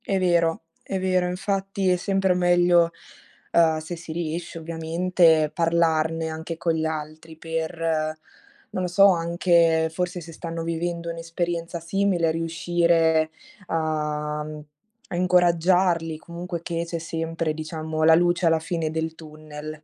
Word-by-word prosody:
È 195 - 0
vero, 170 -3 +2 0.2
è 190 - -3
vero. 185 -1 +1
Infatti 195 +1 -1
è 180 - +4
sempre 195 0 +1
meglio, 175 -1 +4 0.6
uhm, 160 -2 +4
se 155 +3 -5
si 165 -1 -9
riesce. 165 +1 -4
ovviamente, 165 -1 +2
parlarne 165 -1 +1
anche 160 +1 -5
con 165 0 0
gli 160 0 -1
altri 160 +1 -6
per, 165 +1 -4 0.9
non 185 - -3
lo - - 0
so, 180 +3 +5
anche, 170 -1 +2
forse, 180 +1 -2
se 165 -1 -10
stanno 165 0 -5
vivendo 170 +1 -3
un'esperienza 170 0 -3
simile, 175 -1 +1
riuscire 165 -1 +2 0.4
a, 150 -2 -2
mhmm 155 0 -8 0.5
a - - -2
incoraggiarli, 175 -1 +3
comunque, 170 +1 -6
che 170 0 -3
c'è 170 - -3
sempre, 165 -1 -3
diciamo, 155 0 -4
la 160 0 +7
luce 175 +1 +2
alla 165 -1 +4
fine 165 0 -2
del 160 0 -2
tunnel. 155 -1 -10
165 Hz, 135 wpm, -24 LUFS, 160-175 Hz, 0.9 s, la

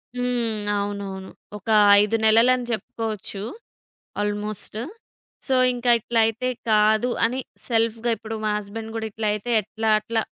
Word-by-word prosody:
హ్మ్. 240 -3 -1 0.2
అవునవును. 200 -2 -4 0.3
ఒక 210 +3 -10 0.3
5 210 +2 +1
నెలలని 240 +3 +4
జెప్పుకోవచ్చు 215 -2 -4 0.8
ఆల్‌మోస్ట్. 210 0 -3 0.7
సో, 265 - +2 0.2
ఇంకా 245 0 +1
ఇట్లయితే 225 +2 +1 0.2
కాదు 215 +2 +4 0.2
అని 250 +3 -1 0.3
సెల్ఫ్‌గా 230 0 +1
ఇప్పుడు 225 +1 -6
మా 210 - +1
హస్బాండ్ 220 +2 -7
గూడా 220 -1 -2
ఇట్లా 215 +1 -3
అయితే 210 +3 -4
ఎట్లా? 220 +2 -3
అట్లా 225 +1 -1
220 Hz, 120 wpm, -23 LUFS, 210-230 Hz, 0.8 s, నెలలని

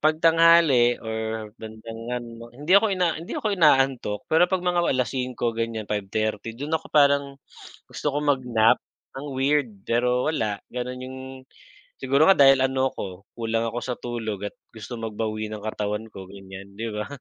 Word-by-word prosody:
kapag 155 +1 +3
tanghali 165 -7 +6
or 110 -1 -4
bandang 110 +1 -9
ano 120 -1 -6
hindi 150 +5 -1
ako 200 +3 +7
ina 180 -4 0
hindi 170 - -6
ako 215 - -1
inaantok 135 - +3
pero 165 +3 +4
kapag 185 -1 -1
mga 175 -1 +2 0.2
5:00 125 -2 -1
ganiyan 115 -1 -3
5:30 105 +2 -2
do'n 145 +4 -6
ako 160 0 -1
parang, 140 -1 +5 0.7
gusto - - -7
ko - - +1
mag-nap, 125 -6 +3 0.4
ang 140 - -7
weird 140 0 +2 0.2
pero 125 +4 +1
wala 110 -8 -1 0.2
gano'n 125 +1 -4
yung, 130 0 -8 0.8
siguro 135 +4 +3
nga 195 - +7
dahil 135 -1 +7
ano 130 0 +1
ko, 95 0 -7
kulang 115 0 -1
ako 120 - -4
sa 125 - -3
tulog 115 -4 -4
at - - -32 0.2
gusto 115 +2 -8
magbawi 110 -1 -3
ng 105 -1 -7
katawan 105 0 -3
ko 95 - -8
ganiyan, 95 0 -11
'di 115 +2 -4
ba? 105 0 -4
120 Hz, 165 wpm, -24 LUFS, 110-140 Hz, 0.8 s, ako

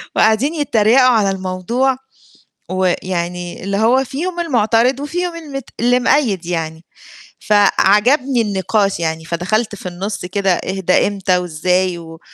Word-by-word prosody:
وقاعدين 220 +8 +2
يتّريقوا 245 -5 +3
على 215 -5 +3
الموضوع، 190 +8 -1 0.7
ويعني 180 -1 -2
اللي 200 +1 -2
هو 240 +5 +3
فيهم 340 +7 -4
المعترض 245 -3 +2
وفيهم 340 +4 -3
المت 280 -6 -7
اللي 245 +2 +3
مأيّد 230 - +1
يعني، 165 -1 -4 0.5
فعجبني 215 +6 +3
النقاش 200 -1 0
يعني 160 -1 -3
فدخَلت 205 +7 -1
في 190 - -13
النُص 190 +2 -5
كده 190 0 0
إيه 190 +2 -4
ده 185 0 +3
إمتى 195 -2 0
وإزاي؟ 180 +1 0
و 165 -1 -11
205 Hz, 125 wpm, -17 LUFS, 180-250 Hz, 0.7 s, يتّريقوا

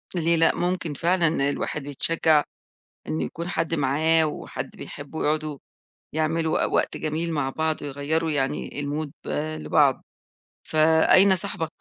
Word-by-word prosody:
ليه 170 -1 +2
لأ، 165 - +3
ممكن 175 -3 -1
فعلًا 165 -3 +1
الواحد 150 +1 -3
بيتشجع 150 +2 +2 0.7
إنه 80 +1 -1
يكون 170 - -6
حد 165 -2 -1
معاه، 160 +3 +2
وحد 150 - -6
بيحبه 145 +2 -7
يقعدوا 155 -1 -1 0.6
يعملوا 160 0 +1
وق - - -4
وقت - - +1
جميل 160 +2 -2
مع 145 -3 -1
بعض، 160 +2 -2
ويغيَّروا 145 +3 -1
يعني 135 -2 -1
الMood 145 +1 -3 0.5
لبعض، 140 -4 +3 0.6
فأين 160 +5 +5
صاحبك 170 -4 -2
155 Hz, 125 wpm, -24 LUFS, 145-165 Hz, 0.7 s, فأين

